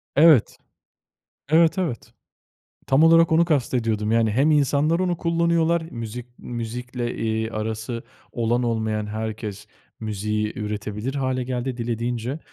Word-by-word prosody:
Evet. 150 Hz, -5 st, +5 dB, 0.9 s
Evet, 165 Hz, +3 st, +4 dB
evet. 165 Hz, -, -3 dB, 0.7 s
Tam 135 Hz, +3 st, +4 dB
olarak 165 Hz, 0 st, +6 dB
onu 165 Hz, +1 st, +5 dB
kast 145 Hz, -7 st, 0 dB
ediyordum 110 Hz, -3 st, 0 dB
yani 115 Hz, -1 st, +3 dB
hem 135 Hz, +8 st, +3 dB
insanlar 150 Hz, +2 st, +2 dB
onu 180 Hz, -2 st, 0 dB
kullanıyorlar, 170 Hz, 0 st, +2 dB
müzik 115 Hz, +1 st, -6 dB
müzikle, 120 Hz, +1 st, -5 dB
iii, 110 Hz, 0 st, -1 dB
arası 110 Hz, +2 st, -4 dB, 0.3 s
olan 120 Hz, +1 st, 0 dB
olmayan 110 Hz, -2 st, -1 dB
herkes 105 Hz, -1 st, -5 dB, 0.3 s
müziği 105 Hz, 0 st, -2 dB
üretebilir 105 Hz, +4 st, -4 dB
hâle 130 Hz, -2 st, -1 dB
geldi 125 Hz, 0 st, -3 dB
dilediğince 120 Hz, +2 st, -3 dB
120 Hz, 120 wpm, -23 LUFS, 110-145 Hz, 0.9 s, olarak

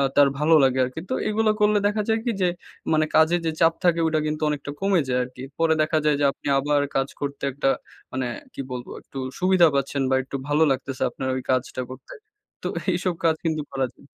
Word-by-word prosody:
তার 145 Hz, -1 st, +7 dB
ভালো 160 Hz, +2 st, +4 dB
লাগে 130 Hz, 0 st, +3 dB
আরকি। 130 Hz, +5 st, -6 dB
তো -, -, 0 dB, 0.2 s
এগুলো 215 Hz, 0 st, +2 dB
করলে 210 Hz, 0 st, +4 dB
দেখা 210 Hz, +1 st, 0 dB
যায় 220 Hz, 0 st, +2 dB
কী? 240 Hz, -, +1 dB
যে 180 Hz, -, +4 dB, 0.5 s
মানে 155 Hz, 0 st, +3 dB
কাজে 160 Hz, +2 st, +5 dB
যে 160 Hz, -, +1 dB
চাপ 165 Hz, 0 st, +5 dB
থাকে, 170 Hz, -1 st, +3 dB
ওইটা 155 Hz, -1 st, +2 dB
কিন্তু 150 Hz, +1 st, -3 dB
অনেকটা 145 Hz, -1 st, -3 dB
কমে 195 Hz, -3 st, +3 dB
যায় 125 Hz, 0 st, +1 dB
আরকি। 125 Hz, +1 st, -9 dB
পরে 165 Hz, -1 st, +3 dB
দেখা 155 Hz, +1 st, +1 dB
যায় 150 Hz, -1 st, +4 dB
যে 145 Hz, -, +3 dB
আপনি -, -, -10 dB
আবার 145 Hz, +1 st, +2 dB
কাজ 135 Hz, 0 st, +2 dB
করতে 140 Hz, -1 st, -4 dB
একটা 140 Hz, 0 st, -1 dB, 0.5 s
মানে 130 Hz, -1 st, -1 dB, 0.3 s
কী -, -, -5 dB
বলবো? 125 Hz, -1 st, -6 dB
একটু 135 Hz, -, -12 dB, 0.2 s
সুবিধা 185 Hz, -2 st, +5 dB
পাচ্ছেন 140 Hz, 0 st, 0 dB
বা, 130 Hz, -, +3 dB
একটু 135 Hz, -, -8 dB
ভালো 150 Hz, +2 st, +3 dB
লাগতেছে 135 Hz, 0 st, -2 dB
আপনার 130 Hz, -, -5 dB
ওই 130 Hz, -, -2 dB
কাজটা 130 Hz, 0 st, -1 dB
করতে। 130 Hz, 0 st, -10 dB, 0.5 s
তো -, -, -1 dB
এ -, -, -10 dB
এইসব 175 Hz, 0 st, 0 dB
কাজ 160 Hz, -1 st, +4 dB
কিন্তু 155 Hz, -2 st, 0 dB
করা 135 Hz, -1 st, 0 dB
যায়। -, -, -21 dB
150 Hz, 220 wpm, -24 LUFS, 135-165 Hz, 0.5 s, তার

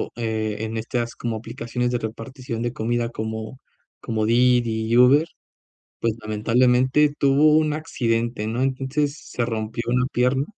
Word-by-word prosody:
eh, 110 Hz, -2 st, -2 dB
en 110 Hz, 0 st, -3 dB
estas 115 Hz, +1 st, -3 dB
como 115 Hz, -2 st, -3 dB
aplicaciones 120 Hz, +2 st, -3 dB
de 120 Hz, -, +1 dB
repartición 115 Hz, +1 st, -6 dB
de 120 Hz, 0 st, -1 dB
comida 120 Hz, 0 st, -1 dB
como 110 Hz, +1 st, -5 dB, 0.4 s
como 110 Hz, -2 st, -2 dB
Didi 120 Hz, -1 st, +2 dB
y 115 Hz, -, +1 dB
Uber. 135 Hz, +6 st, +6 dB, 0.7 s
Pues, 115 Hz, -1 st, 0 dB
lamentablemente 125 Hz, +6 st, +2 dB
tuvo 145 Hz, +2 st, +4 dB
un 155 Hz, -1 st, +2 dB
accidente, 120 Hz, -7 st, -1 dB
¿no? 115 Hz, +3 st, -2 dB
Entonces 135 Hz, +3 st, -1 dB
se 120 Hz, -, -5 dB
rompió 115 Hz, 0 st, -3 dB
una 125 Hz, +1 st, +2 dB
pierna. 125 Hz, +2 st, +2 dB
120 Hz, 140 wpm, -23 LUFS, 115-130 Hz, 0.7 s, Uber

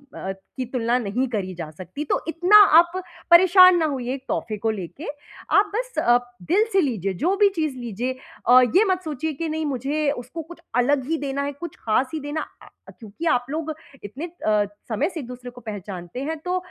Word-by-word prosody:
अ, 190 Hz, -, -4 dB, 0.3 s
की 260 Hz, -, -2 dB
तुलना 240 Hz, 0 st, 0 dB
नहीं 245 Hz, +4 st, -1 dB
करी 195 Hz, -5 st, -3 dB
जा 165 Hz, -3 st, -6 dB
सकती। 185 Hz, -, -7 dB
तो -, -, 0 dB
इतना 355 Hz, +5 st, +5 dB, 0.2 s
आप 345 Hz, 0 st, +3 dB, 0.4 s
परेशान 365 Hz, +1 st, +8 dB
ना 320 Hz, -, +2 dB
होइए 255 Hz, -3 st, -3 dB
एक 265 Hz, -, -10 dB
तोहफ़े 215 Hz, -2 st, -2 dB
को 225 Hz, +2 st, -1 dB
लेके, 205 Hz, -, -7 dB, 0.5 s
आप 405 Hz, 0 st, +3 dB
बस -, -, -3 dB
अप 245 Hz, 0 st, +2 dB, 0.2 s
दिल 400 Hz, +5 st, +4 dB
से 390 Hz, -, +5 dB
लीजिए, 210 Hz, -, -1 dB
जो 350 Hz, -, 0 dB
भी 410 Hz, -1 st, +5 dB
चीज़ 310 Hz, -5 st, -1 dB
लीजिए 240 Hz, +2 st, -3 dB, 0.4 s
अ, 255 Hz, +1 st, +9 dB
ये 395 Hz, -, +7 dB
मत 370 Hz, -1 st, 0 dB
सोचिए 310 Hz, 0 st, -3 dB
कि 320 Hz, +3 st, -4 dB
नहीं, 315 Hz, 0 st, -2 dB
मुझे 280 Hz, +3 st, -1 dB
उसको 255 Hz, +5 st, -6 dB
कुछ 335 Hz, +2 st, -13 dB, 0.2 s
अलग 280 Hz, 0 st, +2 dB
ही 325 Hz, -, +1 dB
देना 280 Hz, 0 st, -2 dB
है, 285 Hz, -, -2 dB
कुछ 325 Hz, +3 st, -8 dB
ख़ास 240 Hz, +4 st, +2 dB
ही 315 Hz, -, -2 dB
देना 290 Hz, +2 st, -3 dB, 0.2 s
अ -, -, -14 dB, 0.2 s
अ, -, -, -10 dB
क्योंकि 220 Hz, +9 st, -8 dB
आप 245 Hz, -3 st, +2 dB
लोग 315 Hz, 0 st, -3 dB, 0.3 s
इतने 260 Hz, -, -6 dB, 0.2 s
अ, 210 Hz, -1 st, +3 dB, 0.2 s
समय 220 Hz, -, 0 dB
से 340 Hz, -, -6 dB
एक-दूसरे 250 Hz, 0 st, -9 dB
को 245 Hz, 0 st, -14 dB
पहचानते 200 Hz, 0 st, -7 dB
हैं, 320 Hz, +2 st, -3 dB
तो 360 Hz, +3 st, -2 dB
270 Hz, 210 wpm, -23 LUFS, 235-325 Hz, 0.5 s, अ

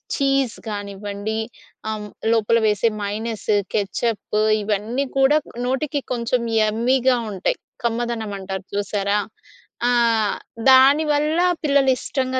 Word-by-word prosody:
Cheese 275 Hz, -3 st, +1 dB
కానివ్వండి 205 Hz, +1 st, -4 dB, 0.5 s
ఆహ్, 220 Hz, -, -2 dB
హ్మ్, 210 Hz, -, -7 dB, 0.3 s
లోపల 230 Hz, +1 st, +3 dB
వేసే 210 Hz, +2 st, +2 dB
మైనీస్, 215 Hz, +1 st, -3 dB, 0.2 s
కెచప్పు 210 Hz, +1 st, -1 dB, 0.2 s
ఇవన్నీ 215 Hz, +6 st, -1 dB
కూడా 270 Hz, +3 st, +5 dB, 0.3 s
నోటికి 280 Hz, +3 st, -1 dB
కొంచెం 240 Hz, +1 st, 0 dB, 0.2 s
యమ్మీగా 245 Hz, +4 st, +2 dB
ఉంటాయి. 190 Hz, -1 st, -1 dB, 0.3 s
కమ్మదనం 235 Hz, -2 st, -2 dB
అంటారు 190 Hz, 0 st, -6 dB
చూసారా. 200 Hz, 0 st, 0 dB, 0.7 s
ఆ! -, -, +3 dB, 0.8 s
దానివల్ల 295 Hz, +4 st, +4 dB, 0.2 s
పిల్లలు 280 Hz, -2 st, +3 dB
ఇష్టంగా 260 Hz, -1 st, -2 dB
230 Hz, 100 wpm, -21 LUFS, 205-265 Hz, 0.8 s, కూడా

